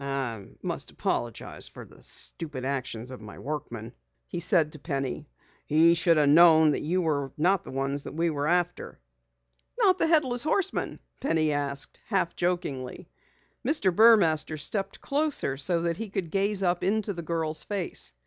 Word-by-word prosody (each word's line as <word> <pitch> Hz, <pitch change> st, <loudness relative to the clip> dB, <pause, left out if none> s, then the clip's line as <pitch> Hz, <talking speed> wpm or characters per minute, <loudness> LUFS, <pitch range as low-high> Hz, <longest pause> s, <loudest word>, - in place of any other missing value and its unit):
"I 130 Hz, -7 st, -3 dB, 0.2 s
must -, -, -3 dB
apologize 120 Hz, -2 st, -3 dB
for -, -, -11 dB
the -, -, -18 dB
stupid 150 Hz, -6 st, -2 dB
actions 130 Hz, -3 st, -3 dB
of 130 Hz, -, -9 dB
my 105 Hz, -1 st, -11 dB
workman," 120 Hz, -6 st, -6 dB, 0.3 s
he -, -, -5 dB
said 170 Hz, -3 st, +3 dB
to 155 Hz, -, -6 dB
Penny. 135 Hz, -, -4 dB, 0.4 s
"He 160 Hz, +3 st, +5 dB
should 170 Hz, -1 st, +3 dB
have 145 Hz, -2 st, +4 dB
known 160 Hz, 0 st, +7 dB
that -, -, -1 dB
you 180 Hz, +4 st, 0 dB
were 140 Hz, -4 st, -1 dB
not 180 Hz, +5 st, +2 dB
the -, -, -11 dB
one 135 Hz, +1 st, -2 dB, 0.2 s
we 165 Hz, +2 st, 0 dB
are 145 Hz, -1 st, -2 dB
after." 175 Hz, +1 st, -1 dB, 0.8 s
"Not 380 Hz, -6 st, +3 dB
the -, -, +3 dB
Headless 275 Hz, -7 st, +3 dB
Horseman?" 380 Hz, +6 st, -1 dB, 0.2 s
Penny 160 Hz, -, +1 dB
asked, 140 Hz, -1 st, -2 dB
half 195 Hz, -5 st, 0 dB
jokingly. 145 Hz, -8 st, -3 dB, 0.5 s
Mr. 200 Hz, -, +1 dB
Burmaster 170 Hz, -9 st, +5 dB
stepped 195 Hz, +7 st, -3 dB
closer 285 Hz, -, +1 dB
so 165 Hz, +5 st, +1 dB
that 170 Hz, -1 st, -1 dB
he 225 Hz, -2 st, -5 dB
could 190 Hz, -5 st, -4 dB
gaze 200 Hz, 0 st, +1 dB
up 175 Hz, -1 st, +1 dB
into 205 Hz, +1 st, 0 dB
the 170 Hz, -, -6 dB
girl's 160 Hz, -1 st, -2 dB
face. 195 Hz, -, 0 dB
165 Hz, 160 wpm, -27 LUFS, 140-195 Hz, 0.8 s, known